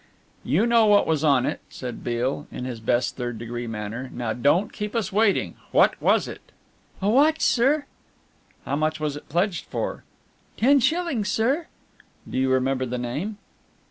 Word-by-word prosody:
"You 195 +9 +2
know 235 -2 +4
what 205 -1 +5
was 160 -2 0
on 140 -4 +4
it," - - -2
said 125 -2 -7
Beale, 125 +4 -2
in 125 - -5
his 125 -3 -5
best 120 +2 0
third 120 -2 -4
degree 120 +1 -5
manner, 115 +3 -5
"now 120 -2 -3
don't 145 - +2
keep 210 +1 -5
us 220 -2 -1
waiting. 210 -1 +2 0.2
What - - +4
was - - +3
it?" - - -8 0.6
"A - - +2
watch, 295 +8 +4
sir." 280 +5 +3 0.8
"How - - -1
much 155 +1 0
was 150 -2 -2
it 145 - -11
pledged 175 +4 0
for?" - - -4 0.5
"Ten 275 +5 +5
shillings, 295 - 0
sir." 265 +11 +1 0.6
"Do - - -2
you 130 0 +2
remember 130 0 +1
the 125 +1 -3
name." 145 - -4
150 Hz, 170 wpm, -24 LUFS, -, 0.8 s, what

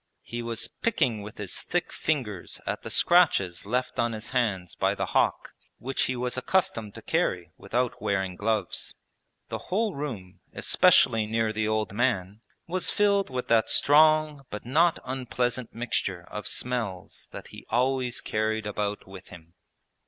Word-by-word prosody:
He 120 0 -5
was 115 -1 -1
picking 125 - 0
with 105 +1 -9
his 100 -3 -2
thick 175 0 -2
fingers 120 - -2
at - - -3
the - - -7
scratches 100 - +3
left 125 +3 -1
on 115 0 +1
his 110 +1 -6
hands 100 -9 0
by - - +1
the - - -1
hawk, - - +1 0.3
which 135 +3 -1
he 130 - -1
was 125 0 -2
accustomed 130 - 0
to - - -10
carry - - 0
without 125 0 -2
wearing 95 -2 -1
gloves. 105 -1 -1 0.5
The - - -3
whole 210 +2 +1
room, 105 - -6
especially 110 -1 +4
near 110 0 0
the 110 0 0
old 110 -2 -1
man, 105 -3 0 0.2
was 180 +2 0
filled 200 -3 +2
with 130 -1 -4
that 115 -1 +4
strong 155 -1 +4
but 105 - -7
not 165 +7 +3
unpleasant 125 -1 -2
mixture 100 -6 -2
of 105 - -5
smells 115 -8 -3
that - - -9
he - - -12
always 125 0 +1
carried 110 0 -1
about 105 -1 -3
with 95 -1 -11
him. 85 -2 -14
115 Hz, 155 wpm, -27 LUFS, 105-130 Hz, 0.5 s, especially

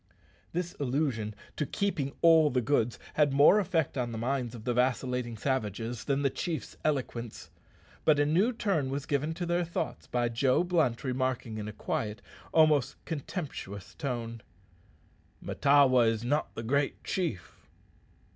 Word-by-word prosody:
This 175 +1 -3
allusion 125 -6 -1 0.2
to - - +1
keeping 150 -4 -1
all 160 -2 +7
the 125 - +1
goods 120 -2 +1 0.2
had 150 -2 +3
more 145 +9 +6
effect 165 -9 0
on 120 -1 -1
the 115 - -5
minds 125 0 -2
of 110 - -9
the 125 +1 0
vacillating 125 -1 0
savages 115 -2 -2
than 140 0 0
the 140 - +2
chief's 165 +1 -4
eloquence. 125 -6 -3 0.5
But 155 -2 +4
a 145 - +4
new 180 +11 +3
turn 195 - 0
was 140 +1 -3
given 150 +3 -1
to 175 - -3
their 175 +1 +1
thoughts 170 0 -4
by 120 -1 0
Joe 130 +6 +2
Blunt 160 -10 +1
remarking 130 -4 -2
in 105 - -5
a - - -4
quiet, 105 0 -3 0.3
almost 155 -5 +4
contemptuous 140 - -5
tone, 115 -5 -4 1.0
"Mahtawa 135 -4 +4
is 115 0 0
not 145 +5 -1
the 115 - -5
great 140 +4 0
chief." 165 - -4
135 Hz, 150 wpm, -30 LUFS, 120-155 Hz, 1.0 s, all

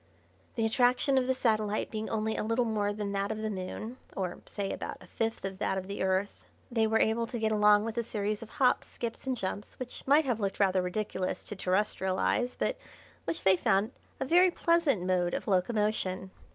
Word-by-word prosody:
The 225 - +1
attraction 250 +4 +3
of 255 - -1
the 260 - +2
satellite 215 -4 0
being 220 0 -3
only 220 0 -1
a - - -1
little 230 +3 +1
more 210 -2 0
than 205 -1 -3
that 200 +1 -1
of 220 - -3
the 215 0 -2
Moon 210 +5 -5 0.2
or, 185 -2 -2
say, 200 -2 -3
about - - -5
a - - -14
fifth 225 -3 -2
of 190 -1 -5
that 190 - 0
of 190 - -3
the 200 +1 -5
Earth 190 +1 -1 0.2
they 225 -2 +2
were 220 +1 +3
able 230 +1 +2
to 240 - -4
get 220 -1 0
along 210 -1 +5
with 225 0 -4
a - - 0
series 210 -2 -2
of 225 - -9
hops, 255 +2 +2
skips, 235 +2 -6
and 260 -1 0
jumps 200 0 -4
which 255 -1 -7
might 290 +3 +5
have 245 -4 0
looked 195 -2 -2
rather 190 -2 +3
ridiculous 185 0 -2
to 210 - -7
terrestrial 190 0 0
eyes, 245 0 +1
but - - -1 0.5
which 330 - -3
they 190 -1 +6
found 195 +5 +2 0.3
a - - -1
very 355 +6 +6
pleasant 335 - +2
mode 180 -1 +1
of - - -4
locomotion. 190 -1 0
215 Hz, 210 wpm, -30 LUFS, 195-235 Hz, 0.5 s, they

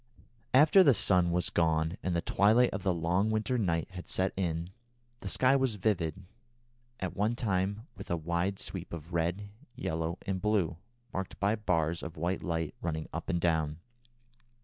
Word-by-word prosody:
After 155 +8 +7
the 140 -9 +6
sun 90 -4 +3
had 90 +3 0
gone 80 0 +2
and 90 -2 -1
the 85 - 0
twilight 110 +8 +4
of 95 - -4
the 95 - +1
long 90 +5 +1
winter 110 +3 0
night 85 -3 0
had 90 -1 -9
set 95 +1 0
in, 85 -1 -2 0.5
the 95 - -5
sky 130 +5 +4
was 130 -5 +1
vivid, 95 -4 -1 0.7
at 95 - -4
one 105 +4 +1
time, 100 -1 -1
with - - -10
a 85 - 0
wide 85 +4 -1
sweep - - -5
of 85 +1 -8
red, 85 +5 -1 0.3
yellow, 80 +2 -2
and 95 -1 -2
blue, 100 -7 +1 0.4
marked 95 0 -4
by 100 +2 +2
bars 85 -6 0
of 80 0 -7
white 85 +4 -1
light 80 -3 -2
running 80 -2 -3
up 80 - -5
and 85 -2 +1
down. 80 -3 +1
90 Hz, 170 wpm, -31 LUFS, 85-105 Hz, 0.7 s, After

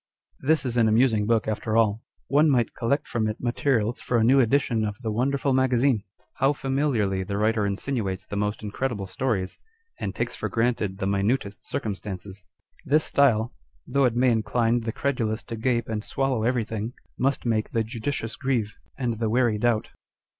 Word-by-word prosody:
l - - -9
This 155 -3 +3
is 125 -1 -1
an 115 -2 +5
amusing 110 -2 +3
book 115 -2 +2
after 110 +1 -1
all. 110 -1 +2 0.3
One 150 +3 +4
might 120 -5 +2
collect 135 +5 0
from 110 -2 0
it 110 +1 -3
materials 120 -2 0
for 125 - 0
a 110 - +3
new 130 +4 +5
edition 120 -2 +2
of 105 -1 -3
the 110 - -1
Wonderful 135 +4 +1
Magazine. 130 -2 +3 0.4
How 135 +2 +3
familiarly 130 -9 0
the 100 +2 -3
writer 110 0 +2
insinuates 100 -2 -2
the - - -6
most 105 +1 -2
incredible 105 0 -2
stories, 95 -1 -2 0.4
and - - -3
takes - - -2
for - - -3
granted 115 -5 0
the 95 - -2
minutest 100 +2 -1
circumstances! 100 -1 -5 0.4
This 155 0 +3
style, 120 -5 +3 0.3
though 140 +1 +2
it 120 -2 +1
may 125 +1 +4
incline 115 +2 +1
the 115 -1 -3
credulous 115 -4 -1
to 115 - -6
gape 120 0 0
and 110 -1 -3
swallow 135 -2 -1
everything, 115 -1 -1 0.3
must 135 0 0
make 110 -2 0
the 115 - 0
judicious 115 +1 -3
grieve, 120 -6 -1 0.2
and 120 -5 -2
the 115 -2 0
wary 120 -2 +2
doubt. 115 -1 +1
115 Hz, 175 wpm, -25 LUFS, 105-130 Hz, 0.4 s, an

